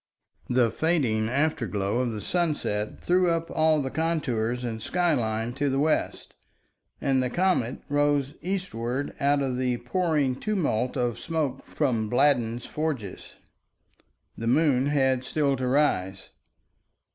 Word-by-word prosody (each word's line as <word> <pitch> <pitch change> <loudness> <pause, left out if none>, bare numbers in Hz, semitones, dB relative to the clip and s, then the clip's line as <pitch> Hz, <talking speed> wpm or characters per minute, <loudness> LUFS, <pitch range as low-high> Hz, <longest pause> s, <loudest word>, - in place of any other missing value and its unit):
The 125 -2 +3
fading 125 -10 +1
afterglow 115 - 0
of 125 -2 0
the 105 -2 -5
sunset 150 - -1
threw 180 0 +3
up 165 0 -1
all 155 -2 +3
the 130 - -4
contours 125 -8 -1
and 115 -2 -4
skyline 120 -8 0
to 140 +2 0
the 135 - 0
west, 155 +2 0 0.7
and 135 -1 +1
the 125 - -1
comet 175 -7 0
rose 145 -1 +1
eastward 145 -9 -3
out 140 0 +2
of 130 -2 -1
the 125 -1 0
pouring 145 -1 0
tumult 155 - -1
of 120 -2 -1
smoke 150 -5 -3
from 115 -7 0
Bladden's 120 -2 +2
forges. 145 -11 -4 1.0
The 115 - -4
moon 135 0 +3
had 130 -3 +2
still 140 +1 +1
to 130 0 -2
rise. 95 -9 0
135 Hz, 130 wpm, -26 LUFS, 120-155 Hz, 1.0 s, The